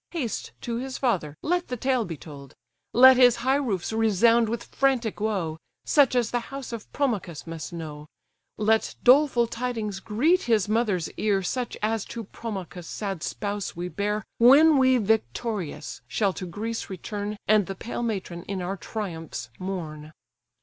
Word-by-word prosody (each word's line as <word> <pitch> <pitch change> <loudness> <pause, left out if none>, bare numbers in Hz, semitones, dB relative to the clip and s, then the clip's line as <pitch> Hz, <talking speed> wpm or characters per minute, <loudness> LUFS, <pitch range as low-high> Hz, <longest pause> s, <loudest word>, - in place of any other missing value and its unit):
Haste, 275 -10 -3
to 235 -1 -3
his 260 +1 -4
father 180 - 0
let 355 +2 0
the 250 - -4
tale 255 -1 +1
be 165 -4 -6
told: 140 -4 -12 0.4
Let 260 +1 +8
his 245 -2 +7
high 265 +1 +4
roofs 220 -8 -2
resound 225 +1 +4
with 235 +1 -3
frantic 260 -6 0
woe, 190 -7 -1 0.3
Such 280 -4 +4
as 240 -2 +1
the 245 - +1
house 275 -3 -6
of 225 -2 -7
Promachus 205 - -2
must 165 -1 -6
know; 155 -3 -7 0.5
Let 220 +1 +1
doleful 255 -2 +5
tidings 230 -4 -3
greet 285 - +2
his 220 -5 +2
mother's 210 -6 0
ear, 200 -3 +1
Such 250 +6 -3
as 220 -1 +1
to 230 - -6
Promachus' 190 -5 -7
sad 195 -5 -4
spouse 205 +1 -3
we 175 +1 -4
bear, 210 +2 -2 0.2
When 280 +5 +7
we 260 -1 +5
victorious 215 -6 -2
shall 190 - +1
to 185 - -6
Greece 225 +6 -4
return, 205 +2 -5
And 210 -2 +4
the 195 - -4
pale 235 +5 -5
matron 195 -7 -3
in 195 -1 -4
our 185 +2 -3
triumphs 165 - -6
mourn." 155 -5 -5
215 Hz, 160 wpm, -26 LUFS, 185-245 Hz, 0.5 s, Let